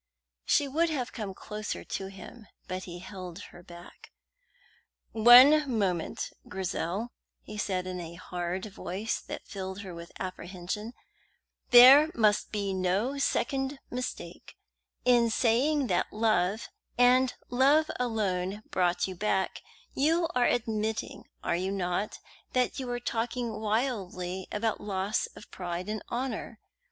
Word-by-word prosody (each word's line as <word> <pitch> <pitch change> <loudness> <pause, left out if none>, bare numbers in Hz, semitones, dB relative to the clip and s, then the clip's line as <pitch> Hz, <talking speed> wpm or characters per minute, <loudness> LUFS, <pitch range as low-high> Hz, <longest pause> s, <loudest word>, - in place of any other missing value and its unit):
She 285 - +3
would 325 +5 +1
have 260 -6 -3
come 205 -5 -5
closer 210 +1 -5
to 195 - -4
him, 195 +3 -11 0.2
but 185 +1 -4
he 175 -1 -8
held 185 -2 -8 0.2
her 175 - -12
back. 175 0 -14 1.0
"One 255 +6 +8
moment, 190 -7 -1 0.2
Grizel," 190 +4 -3 0.3
he 210 - -9
said 190 -3 -1
in 185 -1 -4
a 170 -1 -7
hard 180 +1 -4
voice 200 +1 -4
that - - -8
filled 190 -1 -6
her 190 -3 -8
with 170 0 -9
apprehension. 185 +4 -5 0.8
"There 265 +5 +9
must 210 -3 +2
be 200 -2 -2
no 190 +9 0
second 270 0 0
mistake. 250 0 -6 0.5
In 240 -2 +5
saying 260 +6 +2
that - - 0
love, 215 -1 +1 0.3
and 250 +1 +4 0.2
love 280 +5 +4
alone, 205 -4 -1
brought 175 -1 +1
you 190 - -5
back, 190 0 -1 0.3
you 330 +4 +2
are 250 -1 +3
admitting, 220 -2 -2 0.2
are - - +1
you 185 +2 -1
not, 190 +1 -2 0.4
that 255 +2 +1
you 260 - -4
were 245 0 -2
talking 235 -1 -2
wildly 200 -5 -2
about 220 +1 -1
loss 200 +1 -1
of - - -13
pride 180 0 -5
and 215 0 -3
honour? 240 -2 -4
210 Hz, 130 wpm, -29 LUFS, 185-245 Hz, 1.0 s, There